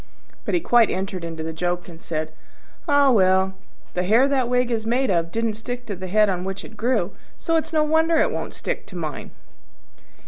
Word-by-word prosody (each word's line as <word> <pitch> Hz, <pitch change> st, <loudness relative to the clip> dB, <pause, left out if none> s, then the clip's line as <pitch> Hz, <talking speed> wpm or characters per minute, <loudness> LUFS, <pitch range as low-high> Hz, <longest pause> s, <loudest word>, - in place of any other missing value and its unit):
But -, -, 0 dB
he -, -, +3 dB
quite 240 Hz, -7 st, +4 dB
entered 190 Hz, -1 st, -3 dB
into 165 Hz, -1 st, -5 dB
the 160 Hz, 0 st, -4 dB
joke, 175 Hz, +2 st, -2 dB
and 165 Hz, -1 st, -12 dB
said, 155 Hz, -1 st, -4 dB, 0.5 s
"Ah, 285 Hz, -2 st, +5 dB
well! 190 Hz, -3 st, +3 dB, 0.4 s
the 180 Hz, -, 0 dB
hair 225 Hz, +9 st, +4 dB
that 265 Hz, -3 st, +1 dB
wig 250 Hz, 0 st, +1 dB
is 225 Hz, -2 st, -1 dB
made 245 Hz, +1 st, +1 dB
of 165 Hz, -2 st, 0 dB
didn't 225 Hz, +1 st, 0 dB
stick 245 Hz, +3 st, -6 dB
to 205 Hz, -, -4 dB
the 185 Hz, +1 st, -6 dB
head 210 Hz, +3 st, +4 dB
on 180 Hz, -2 st, -1 dB
which 195 Hz, +1 st, -5 dB
it 220 Hz, -, -12 dB
grew; 220 Hz, -5 st, 0 dB, 0.3 s
so 330 Hz, -, -1 dB
it's 320 Hz, 0 st, 0 dB
no 310 Hz, -1 st, +3 dB
wonder 320 Hz, +2 st, +3 dB
it -, -, +3 dB
won't -, -, -5 dB
stick -, -, -4 dB
to -, -, -12 dB
mine." -, -, -5 dB
215 Hz, 210 wpm, -23 LUFS, 180-255 Hz, 0.5 s, Ah